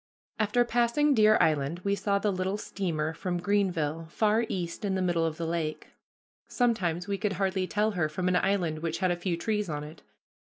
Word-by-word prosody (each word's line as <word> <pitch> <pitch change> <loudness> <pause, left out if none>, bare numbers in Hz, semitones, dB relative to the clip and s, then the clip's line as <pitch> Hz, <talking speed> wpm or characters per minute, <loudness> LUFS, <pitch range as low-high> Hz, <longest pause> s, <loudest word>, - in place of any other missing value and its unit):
After 220 +3 +2
passing 240 +5 +2
Deer 215 -3 +5
Island 155 +2 +1
we 200 - +1
saw 200 0 +1
the 205 +1 0
little 190 +2 -1
steamer 165 -7 -2
from 175 +2 -3
Greenville, 170 -5 0
far 220 +4 +1
east 175 -1 -4
in 195 -2 0
the 190 - 0
middle 170 -2 +1
of 160 -1 -4
the 170 - -3
lake. 160 -2 -3 0.6
Sometimes 195 -8 0
we 200 -1 -2
could 210 -1 0
hardly 190 -1 0
tell 210 +2 +1
her 175 -6 0
from 180 +4 -2
an 180 - +2
island 175 -5 0
which 165 0 -2
had 185 -2 +1
a - - +1
few 175 -1 -2
trees 210 0 -1
on 150 -1 -3
it. 150 +2 -11
185 Hz, 200 wpm, -28 LUFS, 165-210 Hz, 0.6 s, Deer